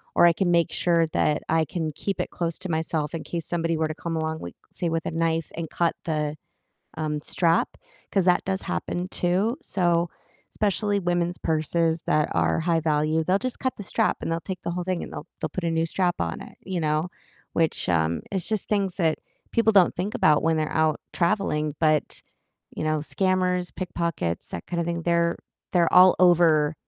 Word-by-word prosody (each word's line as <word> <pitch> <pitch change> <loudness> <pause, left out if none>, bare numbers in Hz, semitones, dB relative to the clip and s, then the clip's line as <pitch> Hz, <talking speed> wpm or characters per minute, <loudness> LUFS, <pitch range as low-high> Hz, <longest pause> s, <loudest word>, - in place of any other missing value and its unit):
or - - +6
I 170 - +6
can 175 0 +1
make 170 -1 +3
sure 170 -2 +2
that 150 - +1
I 160 0 +3
can 160 -2 -3
keep 200 -2 -3
it - - -4
close 170 -2 -3
to 185 - -6
myself 160 -1 -1
in 165 -2 -4
case 170 -2 -4
somebody 165 -1 0
were 160 0 +1
to 155 - -5
come 165 -1 -4
along 160 0 -2
with, 85 - -7 0.2
say, 175 - -2
with 165 0 -2
a - - -2
knife, 165 -1 0
and 165 -1 -4
cut 170 -1 0
the, 150 -2 -1 0.6
um, 150 -1 -2
strap, 165 +1 +1 0.4
'cause 195 -3 +2
that 180 -1 +3
does 190 0 -2
happen 180 +1 -3
too, 190 +8 0
so, 175 -2 +1 0.4
especially 205 0 0
women's 175 -1 0
purses 160 +1 0
that 150 0 +2
are - - +1
high 165 0 +1
value, 155 0 +1
they'll 185 +4 +2
just 255 +3 -4
cut 260 0 -1
the - - -7
strap - - +1
and - - -3
they'll 165 - -1
take 185 -1 -6
the 170 - -2
whole 180 0 -3
thing, 185 -1 -2
and - - -8
they'll - - -7
they'll - - -1
put 185 - -5
a 170 - +1
new 165 0 +1
strap 175 +1 0
on 85 -1 -2
it, - - -13
you 185 -1 -3
know, 155 +2 0 0.5
which, 165 -1 0
um, 80 -2 +1
it's 190 -3 -2
just 215 -3 -2
things 195 -4 0
that 165 -4 +1 0.3
people 230 -1 +3
don't 195 -4 +5
think 190 +4 -2
about 150 -1 +4
when 165 0 +2
they're 155 -1 -1
out 155 -1 +2
traveling, 160 -5 0
but, 155 -1 +1 0.6
you - - -3
know, 155 0 +1
scammers, 180 +2 0
pickpockets, 170 - -3
that 85 - -7
kind 170 -1 -2
of 170 - -1
thing, 170 -1 -2
they're 170 0 +2 0.4
they're 175 -2 +3
all 185 0 +8
over 165 -4 +5
170 Hz, 205 wpm, -25 LUFS, 160-180 Hz, 0.6 s, all